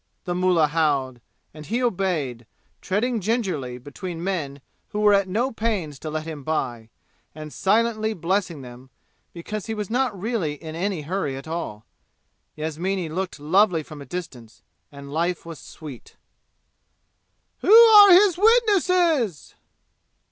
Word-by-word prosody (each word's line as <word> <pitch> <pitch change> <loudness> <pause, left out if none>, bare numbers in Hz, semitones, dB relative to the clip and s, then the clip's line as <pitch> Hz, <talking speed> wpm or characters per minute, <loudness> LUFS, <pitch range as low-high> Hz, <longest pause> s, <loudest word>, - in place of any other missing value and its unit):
the 180 - -3
mullah 180 -3 +3
howled, 145 -5 0 0.3
and 150 0 -11
he 240 +3 -1
obeyed, 165 - -2 0.3
treading 225 +5 -1
gingerly 180 - -2
between 165 +6 -7
men 155 -8 -3 0.3
who 210 - -4
were 210 -1 +5
at 200 -1 +3
no 235 +8 -1
pains 200 -11 -3
to 155 - -6
let 155 0 -3
him 155 -3 -7
by, 120 -7 -3 0.5
and 155 -1 -9
silently 220 +2 +1
blessing 175 -5 -2
them, 125 +1 -12 0.4
because 205 +5 -6
he 225 - -3
was 210 -1 -5
not 245 -5 0
really 205 -7 -2
in 155 +1 -9
any 180 -1 -3
hurry 150 -4 -3
at 135 - -10
all. 160 -11 -5 0.7
Yasmini 165 +3 -3
looked 180 0 -4
lovely 175 +2 +2
from 150 -1 -11
a - - -9
distance, 125 -11 -8 0.3
and 140 0 -10
life 170 +2 -1
was 165 -3 -9
sweet. 145 -6 -12 1.4
"Who - - 0
are 440 -3 +9
his 365 -1 +6
witnesses?" 365 - +2
175 Hz, 140 wpm, -23 LUFS, 150-215 Hz, 1.4 s, are